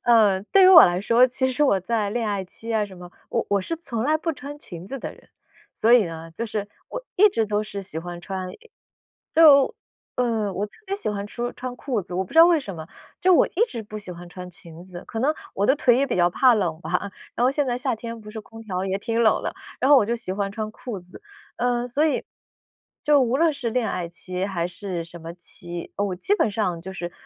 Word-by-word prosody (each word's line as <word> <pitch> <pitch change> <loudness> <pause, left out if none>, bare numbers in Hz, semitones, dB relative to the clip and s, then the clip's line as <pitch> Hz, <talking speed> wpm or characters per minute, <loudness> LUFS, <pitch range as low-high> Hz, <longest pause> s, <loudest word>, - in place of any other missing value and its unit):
呃， 215 -5 +5
对 390 - +7
于 - - +8
我 360 -4 +11
来 175 0 +1
说， 235 +5 +5
其 260 +1 -1
实 275 +4 0
我 195 -8 +3
在 215 +1 -1
恋 230 -1 -1
爱 200 -2 -2
期 225 +5 -7
啊， 215 -2 +2
什 190 -2 -13
么 175 0 -11 0.2
我 - - 0
我 200 -1 +2
是 330 - -3
从 240 -9 -4
来 310 +3 +3
不 330 +1 -2
穿 285 0 -8
裙 175 - -10
子 270 +5 -5
的 - - -6
人。 - - -20 0.5
所 230 +2 +3
以 245 -4 +7
呢 165 -1 -7
就 230 +8 -5
是 205 -1 -3 0.2
我 - - -6
一 420 +3 +7
直 225 - 0
都 210 0 0
是 200 -2 -6
喜 170 -4 -4
欢 175 +1 -7
穿 185 +1 -5 0.9
就 295 -4 +7 0.4
呃， 225 -5 0
我 195 +3 -2
特 - - -32
别 395 +1 -2
喜 405 - -2
欢 205 0 -4
说 240 +2 -4
穿 255 -1 -6
裤 250 -4 -2
子。 175 - -10
我 190 +1 0
不 - - -15
知 325 - 0
道 330 - +11
为 340 -3 +4
什 200 -9 -7
么。 160 0 -8 0.3
就 370 - +5
我 - - +5
一 385 - -3
直 230 - -6
不 215 0 -8
喜 200 -3 -7
欢 175 0 -10
穿 180 0 -9
裙 170 -1 -13
子。 180 -1 -10
可 225 - -4
能 285 +5 +2 0.2
我 200 - +1
的 265 - +4
腿 245 -4 +4
也 275 - +2
比 260 - -2
较 175 -1 +4
怕 250 +7 +5
冷 175 -7 -1
吧。 185 +3 -2 0.2
然 240 - 0
后 - - +5
现 285 +1 0
在 245 -2 -1
夏 250 -2 -1
天 230 +1 -7
不 210 - -11
是 220 +1 -7
空 225 +1 -13
调 190 -4 -3
也 190 0 -1
挺 230 +2 -1
冷 220 - +3
的。 - - -3 0.3
然 265 - +2
后 290 - +9
我 215 - +4
就 235 - 0
喜 230 -5 -5
欢 200 0 -2
穿 215 +1 -4
裤 230 -3 -7
子。 180 0 -14 0.4
嗯， 245 0 0
所 290 +6 +1
以 310 - 0 0.8
就 295 -1 +5
无 245 0 +1
论 330 0 +4
是 245 -5 -3
恋 240 -1 0
爱 180 -2 -3
期， 180 +2 -4
还 175 -4 -2
是 180 -1 -5
什 170 +1 -11
么 165 +1 -8
期， 175 0 -7
我 200 -2 -1
基 390 - +1
本 225 - +1
上 200 -5 -1
就 190 +3 -7
是 175 -2 -5
215 Hz, 270 characters per minute, -24 LUFS, 185-250 Hz, 0.9 s, 我